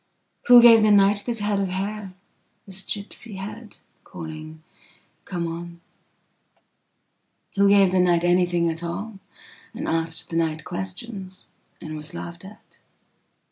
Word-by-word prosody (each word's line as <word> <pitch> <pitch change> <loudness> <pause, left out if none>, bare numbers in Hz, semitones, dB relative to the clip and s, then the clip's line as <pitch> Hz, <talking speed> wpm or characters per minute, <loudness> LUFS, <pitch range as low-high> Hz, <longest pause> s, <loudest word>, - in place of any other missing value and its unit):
Who 245 -1 +9
gave 230 -2 +8
the 215 - +4
nightthis 205 +3 +3
head 205 -1 0
of 195 - 0
hair, 195 +1 -4 0.5
this 190 -1 -1
gipsy 205 +2 -4
headcalling: 180 -6 -10 0.6
Come 175 -3 -3
on? 170 +1 -7 1.8
Who 200 0 +4
gave 200 -2 +5
the 185 - +2
night 175 -1 +3
anything 175 -1 +2
at 165 0 -2
alland 195 +5 -6 0.7
asked 165 0 -2
the 165 - -1
night 160 -2 -1
questionsand 190 +1 -6 0.5
was 150 0 -7
laughed 85 0 -8
at? - - -16
185 Hz, 115 wpm, -23 LUFS, 170-205 Hz, 1.8 s, Who